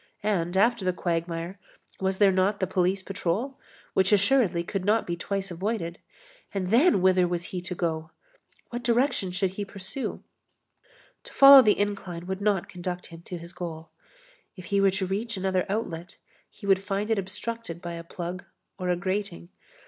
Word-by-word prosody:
And 190 -4 0
after 225 +1 +3
the 185 0 +1
quagmire, 170 +1 -3 0.4
was 190 0 0
there 200 -1 +5
not 190 +2 +1
the 185 - +1
police 185 +1 0
patrol, 205 +7 -2 0.3
which 190 +1 +3
assuredly 200 -4 +3
could 185 +2 -3
not 215 +3 +2
be 175 - -2
twice 195 +2 -3
avoided? 175 -1 -3 0.6
And 185 -1 -1
then, 245 - +5
whither 185 -1 +4
was 175 -1 -2
he 180 - -2
to 180 +1 -5
go? 160 -2 -2 0.6
What 240 0 -3
direction 240 -5 +1
should 185 +1 0
he 205 +2 -4
pursue? 200 +6 -5 1.0
To - - -11
follow 275 0 +10
the 215 -4 +3
incline 195 -4 -3
would 190 +1 -4
not 200 -3 +1
conduct 180 0 -5
him 165 - -10
to 180 - -6
his 170 +2 -10
goal. 165 -3 -7 0.6
If 185 -3 -10
he 200 - +4
were 195 - +5
to 190 0 -1
reach 210 +4 -3
another 190 -1 0
outlet, 175 -5 -3 0.3
he - - -13
would 195 -1 +4
find 205 +2 -2
it 220 - +2
obstructed 195 -1 -5
by 170 0 -6
a 170 0 -6
plug 175 +1 -6 0.4
or 180 -1 -2
a 180 - +3
grating. 185 -1 -3
190 Hz, 175 wpm, -27 LUFS, 175-205 Hz, 1.0 s, follow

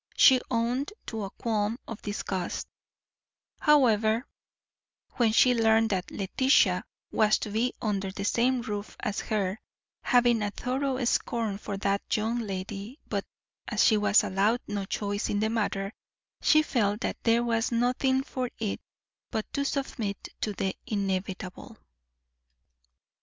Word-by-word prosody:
She 260 -2 +7
owned 245 - 0
to 220 -3 -4
a - - -6
qualm 215 +1 -1
of 225 -2 -7
disgust, 195 -3 -3 0.9
however, 230 -5 +4 0.9
when 235 -4 +4
she 250 +3 +5
learned 225 -1 +3
that 185 -1 -1
Letitia 260 +8 +2 0.3
was 215 -1 +4
to 210 - -5
be 235 +4 0
under 200 -3 -1
the 200 +1 -5
same 245 +3 +2
roof 205 -2 -5
as 205 - -2
herself, 200 -1 -1 0.4
having 240 -2 +3
a 205 - 0
thorough 260 +3 -2
scorn 225 -3 0
for 200 -1 -5
that 200 +2 0
young 225 +3 0
lady; 200 +3 -5
but, - - -1 0.4
as - - +2
she 220 - +5
was 210 0 +4
allowed 210 +6 +1
no 205 -1 -3
choice 205 +1 -2
in 205 - 0
the 220 +1 +1
matter, 205 -2 -1 0.5
she 310 0 +5
felt 210 -6 0
that - - -3
there 230 +1 +3
was 230 0 0
nothing 255 +3 +2
for 255 -3 -3
it 215 -3 -3 0.5
but 220 - -4
to 280 - 0
submit 255 -8 -3
to 210 - -1
the 190 -1 -2
inevitable. 190 -3 -3
220 Hz, 140 wpm, -28 LUFS, 205-245 Hz, 0.9 s, She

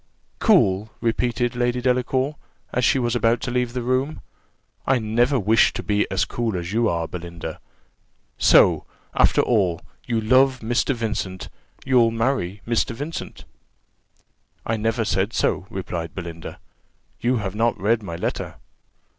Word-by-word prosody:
"Cool!" 110 - +3
repeated 120 +1 0
Lady 120 0 0
Delacour, 130 +3 0 0.4
as 125 - 0
she 135 - +4
was 120 -2 0
about 115 0 +2
to 120 - -3
leave 125 -1 -1
the 125 -1 -3
room, 130 +5 -1 0.7
"I 135 - +4
never 120 +4 +1
wish 110 +2 +4
to - - -5
be 105 0 0
as 95 -2 +1
cool 115 -5 -2
as 85 +2 -5
you 115 0 +2
are, 85 -1 -1
Belinda! 85 -2 -7 0.8
So, - - +5 0.3
after - - +4
all, 95 -8 +1 0.3
you 115 -2 +1
love 130 +3 +3
Mr. 120 +4 0
Vincent 105 -5 -4 0.4
you'll 125 -3 +4
marry 115 -5 -1
Mr. 115 0 0
Vincent!" 150 +6 -6 1.2
"I 110 - 0
never 115 +1 0
said 100 +2 0
so," 95 - 0
replied 90 -5 -5
Belinda: 85 -3 -7 0.6
"you 125 +2 +1
have 100 -4 -3
not 115 +2 0
read 110 +3 +2
my 85 -5 -6
letter. - - -3
115 Hz, 145 wpm, -23 LUFS, 100-125 Hz, 1.2 s, So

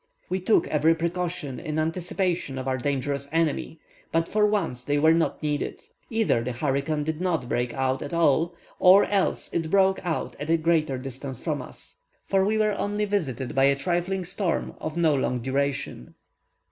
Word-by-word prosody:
We 185 - 0
took 190 +4 +3
every 155 +2 +3
precaution 170 -4 -3
in 155 0 -4
anticipation 170 -2 -1
of 130 0 -4
our 130 0 0
dangerous 140 +1 -2
enemy, 160 0 0 0.3
but 165 0 +1
for 210 0 +3
once 170 - -1
they 145 +2 0
were 160 +2 +5
not 165 -1 0
needed: 150 -1 -2 0.3
either 225 - +2
the 125 +2 -3
hurricane 140 +4 -1
did 160 +2 -3
not 165 -9 0
break 120 0 -1
out 130 0 0
at 145 - -5
all, 170 +1 +2 0.2
or 185 +2 +7
else 200 -2 0
it 165 -2 -1
broke 190 +1 +3
out 170 -2 -2
at 145 - -5
a 165 - +4
great 160 -1 +2 0.2
distance 135 -1 -6
from - - -2
us; - - -11 0.3
for 195 -1 +2
we 215 +3 +1
were 215 -1 +3
only 205 +1 0
visited 145 - -2
by 135 -1 +4
a 140 0 +4
trifling 175 +5 -1
storm 180 0 -2
of 155 +1 -4
no 165 -3 +4
long 130 -2 0
duration. 135 - -2
160 Hz, 180 wpm, -26 LUFS, 140-180 Hz, 0.3 s, or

